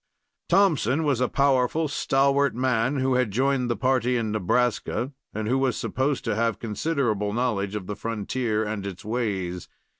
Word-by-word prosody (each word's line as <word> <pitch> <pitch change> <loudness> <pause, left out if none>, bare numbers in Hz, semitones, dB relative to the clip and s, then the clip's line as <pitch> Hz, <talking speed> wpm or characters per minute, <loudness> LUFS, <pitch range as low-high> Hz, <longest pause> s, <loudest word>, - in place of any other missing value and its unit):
Thompson 160 - +3
was 140 -5 +1
a 125 - +3
powerful, 140 +3 +2
stalwart 140 -1 +2
man, 125 +1 +1
who 130 -1 +1
had 125 -3 +2
joined 130 +3 +1
the 120 - +1
party 125 +1 +1
in 110 -2 -1
Nebraska, 120 +5 0 0.2
and 110 0 -4
who 130 +4 +2
was 130 -3 +1
supposed 135 +1 -1
to - - 0
have 115 0 0
considerable 110 -4 -1
knowledge 105 -4 -1
of 100 -3 -4
the 105 - -4
frontier 110 +1 -2
and 105 -2 -4
its 100 +2 -8
ways. 100 -6 -2
125 Hz, 160 wpm, -25 LUFS, 105-135 Hz, 0.2 s, Thompson